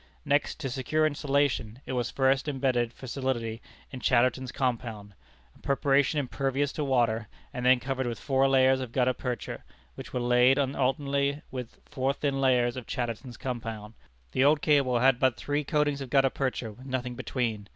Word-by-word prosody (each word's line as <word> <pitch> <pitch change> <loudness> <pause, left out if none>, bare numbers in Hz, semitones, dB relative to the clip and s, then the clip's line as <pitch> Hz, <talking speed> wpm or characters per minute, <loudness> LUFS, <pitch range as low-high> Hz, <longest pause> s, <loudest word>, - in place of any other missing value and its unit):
Next, 145 +2 +1
to 135 - -2
secure 145 +4 0
insulation, 140 -6 0
it - - -4
was 120 -2 -1
first 135 +1 +1
imbedded 130 -4 0
for 130 - -12
solidity 120 -4 -3 0.3
in 130 - -6
Chatterton's 125 +1 +2
compound, 115 -6 -3 0.4
a - - -21
preparation 140 +1 +2
impervious 135 +1 -1
to 150 - -3
water, 120 -5 +1 0.3
and 125 -3 -4
then 125 0 +5
covered 130 +1 -2
with 115 -3 -4
four 135 -1 +2
layers 130 0 +4
of 125 -3 -6
gutta 130 -1 +2
percha, 125 -1 -5 0.3
which - - -9
were 125 - -2
laid 125 +2 +4
on 140 -1 0
alternately 140 +2 0
with 125 -3 -7
four 135 -1 -1
thin 140 -1 -1
layers 125 -2 +3
of 130 -2 -7
Chatterton's 120 0 -4
compound. 115 -4 -5 0.4
The 130 - +2
old 145 +1 +4
cable 140 -5 +3
had 130 +1 +4
but 130 -2 +2
three 145 +1 -1
coatings 145 -1 0
of 135 - -6
gutta 135 0 +3
percha, 130 -4 -2
with 130 +6 -13
nothing 125 -1 -3
between. 115 -5 -3
130 Hz, 175 wpm, -28 LUFS, 120-140 Hz, 0.4 s, then